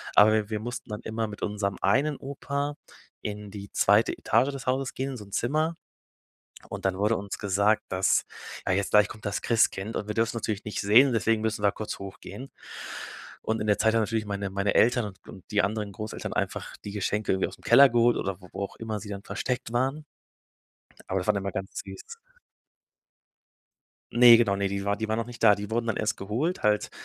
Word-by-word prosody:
aber 105 +1 +8
wir 110 -1 0
wir 105 - -1
mussten 120 +1 -6
dann 105 0 -5
immer 110 0 -2
mit 105 -1 -9
unserem 100 -1 -2
einen 140 +8 +2
Opa 140 +1 -4 0.5
in 105 -1 -5
die 100 -1 -9
zweite 105 +3 +4
Etage 120 +5 +2
des 135 -2 -8
Hauses 130 0 0
gehen, 135 +1 -2
in 130 - -6
so 105 - -9
'n 100 - -18
Zimmer 155 +9 0 0.9
und - - -6
dann 95 -1 +1
wurde 105 +3 +2
uns 100 0 -5
gesagt, 100 +2 +2
dass, 95 -1 +2 0.4
ja, 95 - +3
jetzt 100 0 0
gleich 105 0 +6
kommt 110 - -11
das 100 - -2
Christkind 110 -2 +1
und 105 - -3
wir 105 - -3
dürfen 115 +1 0
natürlich 110 -1 -3
nicht 105 - -3
sehen, 120 +6 +6
deswegen 115 -1 +1
müssen 110 -2 -1
wir 100 - +4
kurz 110 - -6
hochgehen. 100 +7 -9 0.9
Und 110 0 -1
in 110 - -2
der 105 - +3
Zeit 110 0 +3
haben 115 - +4
natürlich 110 0 -1
meine 100 -1 -3
meine 100 +1 0
Eltern 120 -1 +4
und 95 -2 -9
und 95 - -11
die 105 0 +3
anderen 105 0 -2
Großeltern 110 +2 -5
einfach - - -3
die 100 - -5
Geschenke 105 +1 -1
irgendwie 95 - 0
ausm - - -12
Keller 135 +3 +7
geholt 120 0 +3
oder 95 0 -3
wo 90 - -14
wo - - -4
auch 100 - -6
immer 110 -2 -4
sie 105 - -9
dann 100 0 -6
versteckt 125 -2 -3
waren 135 +5 0 1.1
aber 95 - +1
das - - -6
war 105 - +3
immer 100 0 -2
ganz 95 +1 -4
süß. 95 - -10 2.0
Ne, 120 -1 +9
genau, 105 -4 +2
ne, 100 0 0
die 100 0 -2
war 100 0 +1
die 110 +1 -3
waren 110 +1 0
noch 115 - -2
nicht 120 -1 -10
da. 105 -2 +7
Die 105 +2 -7
wurden 115 +1 -1
dann 110 - -1
erst 110 +1 0
geholt, 120 - -2
halt, 105 0 +2
105 Hz, 215 wpm, -27 LUFS, 100-120 Hz, 2.0 s, Ne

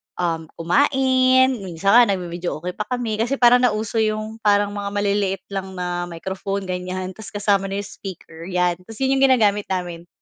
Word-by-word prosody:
um, 165 -2 -2
kumain. 260 - +3
Minsan 190 0 -1
nga 245 - +9
nagbi-videoke 175 -1 -4
pa 210 - -2
kami, 245 -4 -2
kasi 240 +5 +1
parang 245 -1 +6
nauso 220 -1 0
'yung 215 0 -1
parang 205 -1 +2
mga 205 0 -4
maliliit 200 -2 0
lang 190 -1 -5
na 175 -1 -3
microphone 190 +3 -4
ganyan, 185 +1 -4
'tas 220 -1 -10
kasama 200 -1 +1
na 195 - -4
'yung 200 - -6
speaker, 170 -3 -9
'yan. 180 -1 0
'Tas, 225 +5 -12
'yun 265 +1 +2
'yung 270 - +6
ginagamit 210 -6 +2
namin 175 -2 -4
200 Hz, 170 wpm, -21 LUFS, 180-220 Hz, -, nga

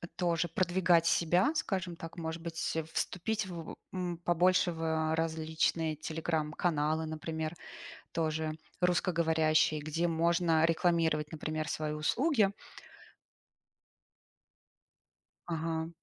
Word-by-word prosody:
тоже 175 -1 +1
продвигать 175 0 +3
себя, 175 - +3
скажем 185 - -1
так, 165 +1 -9
может 165 0 -4
быть, 165 -1 -3
э, 160 - 0
вступить 210 +3 -1
в, 170 -3 -7 0.2
м, 180 -2 -2
побольше 175 +1 +3
в 165 -1 -7
э, 160 -1 +1
различные 160 0 0
телеграм-каналы, 155 0 -1
например, 160 +1 -4 0.6
тоже 160 -1 -1 0.3
русскоговорящие, 160 -3 +2
где 155 +3 -1
можно 165 0 +2
рекламировать, 165 -2 +2
например, 155 0 -3
свои 155 -1 -2
услуги? 205 - +2 2.9
Ага. 165 -1 -2
165 Hz, 95 wpm, -32 LUFS, 160-175 Hz, 2.9 s, продвигать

